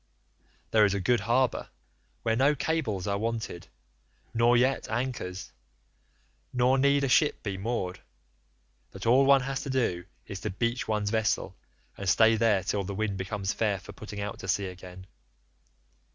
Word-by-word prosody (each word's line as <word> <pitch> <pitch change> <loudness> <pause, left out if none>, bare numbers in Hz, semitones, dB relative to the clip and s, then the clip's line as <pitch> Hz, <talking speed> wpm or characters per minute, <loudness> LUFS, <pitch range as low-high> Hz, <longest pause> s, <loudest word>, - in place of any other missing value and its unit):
There 110 -1 +5
is 100 -1 +3
a - - -1
good 120 +5 +2
harbour 120 +5 +1 0.5
where 115 - +1
no 140 +5 +3
cables 130 - -1
are 100 0 -1
wanted, 110 -5 -4 0.7
nor 120 +1 +4
yet 130 +3 +1
anchors, 110 -6 -4 1.0
nor 125 +1 +3
need 140 +1 +3
a - - +2
ship 145 +3 +2
be 100 -3 -3
moored, 95 -3 -3 0.9
but - - -9
all 130 +4 +5
one 140 -1 +6
has 135 0 -3
to - - -6
do 115 -10 0 0.2
is 100 -2 -7
to - - -3
beach 115 +5 -2
one's 105 -1 0
vessel 110 -3 0 0.4
and 100 -1 -2
stay 115 +2 +5
there 110 -4 +2
till 100 +1 -1
the 100 +1 -5
wind 105 -1 -1
becomes 95 +1 -3
fair 105 -3 0
for 100 +2 -11
putting 105 +1 -8
out 100 0 -4
to - - -7
sea 100 +1 +1
again. 90 0 -9
110 Hz, 165 wpm, -28 LUFS, 100-125 Hz, 1.0 s, one